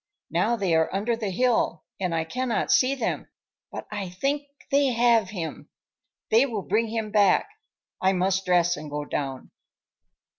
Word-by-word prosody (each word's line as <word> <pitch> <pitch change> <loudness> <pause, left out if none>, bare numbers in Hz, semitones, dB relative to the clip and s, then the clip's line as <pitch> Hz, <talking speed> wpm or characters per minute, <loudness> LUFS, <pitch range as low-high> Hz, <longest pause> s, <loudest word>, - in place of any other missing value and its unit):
Now 235 - +2
they 195 -6 0
are 160 0 +2
under 210 +5 0
the 220 -3 -3
hill 220 -5 +1 0.2
and 180 -3 -1
I 165 - +1
cannot 250 +8 -1
see 265 +2 +4
them, 245 -4 -2 0.4
but - - -6
I 200 -3 -4
think 275 +10 -2 0.2
they 280 0 +4
have 235 -4 +3
him. 170 -6 -6 0.6
They 230 +5 +5
will 215 -6 -4
bring 220 +5 +1
him 220 -1 -3
back. 205 - +4 0.5
I 190 - +4
must 190 +1 +1
dress 175 -1 +3
and 150 -1 -8
go 145 0 -4
down." 135 -3 -4
200 Hz, 160 wpm, -25 LUFS, 175-235 Hz, 0.6 s, They